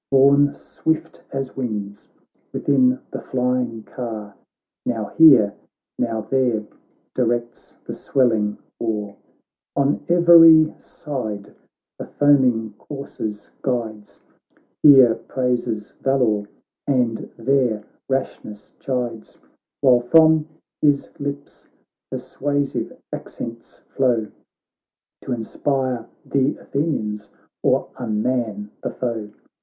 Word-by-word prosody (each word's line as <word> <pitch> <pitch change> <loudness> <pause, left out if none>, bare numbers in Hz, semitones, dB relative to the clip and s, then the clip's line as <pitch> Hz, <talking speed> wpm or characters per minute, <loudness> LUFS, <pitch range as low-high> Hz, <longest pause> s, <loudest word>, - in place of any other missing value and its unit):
Borne 140 +1 +5
swift 160 0 -3
as 135 -1 -4
winds 105 -6 -5 0.4
within 130 -2 +2
the - - -5
flying 125 -3 -1
car. 110 -5 -6 0.5
Now 110 -4 -2
here, 130 -11 +7 0.5
now 115 -2 -1
there, 120 -2 0 0.5
directs 120 -1 -2
the - - -5
swell 130 -3 +1
ing 105 -2 -1 0.2
war, 105 -3 -3 0.6
On 140 0 +1
every 165 -2 +7
side 110 -9 -6 0.5
the - - -6
foaming 125 -7 +3
coursers 110 -7 -7
guides, 110 -5 -4 0.6
Here 135 -6 +8
praises 120 -2 -2
valour, 115 -7 +1 0.4
and 125 -5 0
there 120 -3 +1 0.3
rashness 110 -6 -4
chides; 120 -4 -4 0.4
While 130 -3 +6
from 160 +4 +5 0.3
his 145 -2 +2
lips 140 0 -6 0.4
persuasive 145 -1 -2 0.2
accents 115 0 -8
flow 120 -5 +1 0.9
T' - - -7
inspire 125 +1 -2 0.2
th' 135 0 +1
Athenians, 105 -9 -3 0.3
or - - +1
unman 110 -2 -2
the - - -2
foe. 115 -4 -4
125 Hz, 95 wpm, -21 LUFS, 110-140 Hz, 0.9 s, Here